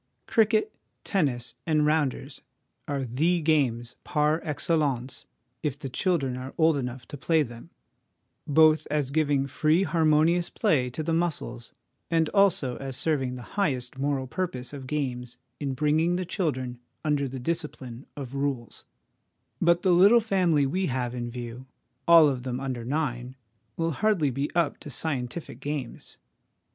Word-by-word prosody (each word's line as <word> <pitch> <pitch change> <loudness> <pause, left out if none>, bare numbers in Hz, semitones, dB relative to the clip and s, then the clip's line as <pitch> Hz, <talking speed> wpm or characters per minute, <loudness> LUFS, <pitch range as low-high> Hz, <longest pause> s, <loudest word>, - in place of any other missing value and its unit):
Cricket, 225 - +2 0.3
tennis, 125 - -1
and 155 -2 +3
rounders 145 -2 0 0.5
are 140 -2 -2
the 160 +9 +1
games 130 -7 +1
par 150 0 +1
excellence 145 -5 -1 0.3
if 145 -2 -2
the 140 -2 -6
children 140 -3 0
are 130 +1 -7
old 160 -1 +4
enough 125 -3 -4
to 145 - -7
play 160 +3 +2
them, 120 -3 -10 0.8
both 155 +1 +5
as 145 -3 0
giving 145 -2 +2
free 155 +6 +2
harmonious 165 0 +3
play 125 -5 +1
to 155 +6 -4
the 165 +1 -1
muscles, 150 -8 -2 0.4
and 165 -1 +2
also 190 -11 +2
as 135 -2 -4
serving 135 -6 0
the 125 - -8 0.2
highest 130 -7 -1
moral 140 -1 0
purpose 130 -4 -4
of 135 -2 -7
games 125 -4 -3 0.2
in 140 -2 -2
bring 150 +3 +2
ing 170 +2 +2
the 185 0 -2
children 130 - -2 0.3
under 145 -2 +1
the 130 0 -6
discipline 135 -5 -4
of 135 -3 -6
rules; 135 -4 -3 0.8
but 170 +1 +3
the 185 - +4
little 200 +7 +7
family 185 -9 +2
we 185 +7 0
have 125 -2 -2
in 120 -1 -4
view, 120 +1 -7 0.4
all 165 -2 +8
of 130 -3 -1
them 125 0 -3
under 130 -3 -4
nine, 125 -2 -2 0.4
will 165 0 0
hardly 175 -4 +1
be 140 +3 -2
up 170 -4 +1
to - - -9
scientific 140 +1 -3
games. 145 -4 -6
145 Hz, 150 wpm, -27 LUFS, 130-165 Hz, 0.8 s, all